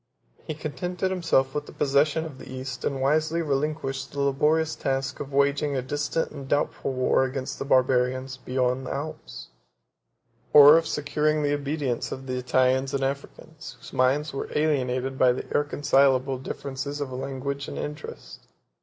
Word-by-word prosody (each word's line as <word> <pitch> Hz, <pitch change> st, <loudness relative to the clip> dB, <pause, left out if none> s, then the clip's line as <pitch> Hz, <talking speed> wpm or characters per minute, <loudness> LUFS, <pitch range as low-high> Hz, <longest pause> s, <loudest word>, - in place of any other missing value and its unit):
He 155 Hz, -, -3 dB
contented 180 Hz, +5 st, -3 dB
himself 160 Hz, -7 st, +1 dB
with 150 Hz, 0 st, -3 dB
the -, -, -9 dB
possession 145 Hz, +3 st, +2 dB
of 140 Hz, -5 st, -9 dB
the -, -, -10 dB
East; 130 Hz, -1 st, -6 dB
and 135 Hz, -1 st, -1 dB
wisely 155 Hz, +4 st, +1 dB
relinquished 140 Hz, -2 st, -2 dB
the 140 Hz, -, -3 dB
laborious 150 Hz, +3 st, +2 dB
task 135 Hz, -1 st, -2 dB
of 145 Hz, -1 st, -6 dB
waging 140 Hz, +1 st, +1 dB
a 130 Hz, -, -2 dB
distant 145 Hz, +4 st, -2 dB
and 140 Hz, -3 st, -8 dB
doubtful 145 Hz, -1 st, 0 dB
war 130 Hz, 0 st, +2 dB
against 130 Hz, +1 st, -4 dB
the -, -, -3 dB
Barbarians 130 Hz, 0 st, +2 dB
beyond 125 Hz, 0 st, -1 dB
the -, -, -4 dB
Alps; 140 Hz, -, -6 dB, 1.0 s
or 145 Hz, +1 st, +10 dB
of 165 Hz, 0 st, +2 dB
securing 150 Hz, +1 st, 0 dB
the 145 Hz, 0 st, +1 dB
obedience 145 Hz, -3 st, -2 dB
of 135 Hz, -, -6 dB
the 130 Hz, -1 st, -3 dB
Italians 130 Hz, +2 st, +1 dB
and 135 Hz, -, -1 dB
Africans, 140 Hz, +1 st, -6 dB
whose -, -, -13 dB
minds 140 Hz, +4 st, +1 dB
were 140 Hz, -, -4 dB
alienated 130 Hz, -3 st, 0 dB
by 125 Hz, -, +6 dB
the -, -, -6 dB
irreconcilable 135 Hz, -2 st, +2 dB
difference 135 Hz, +1 st, -5 dB
of 145 Hz, -2 st, -4 dB
language 140 Hz, +2 st, -4 dB
and -, -, -6 dB
interest. 150 Hz, +1 st, -7 dB
140 Hz, 160 wpm, -26 LUFS, 130-150 Hz, 1.0 s, or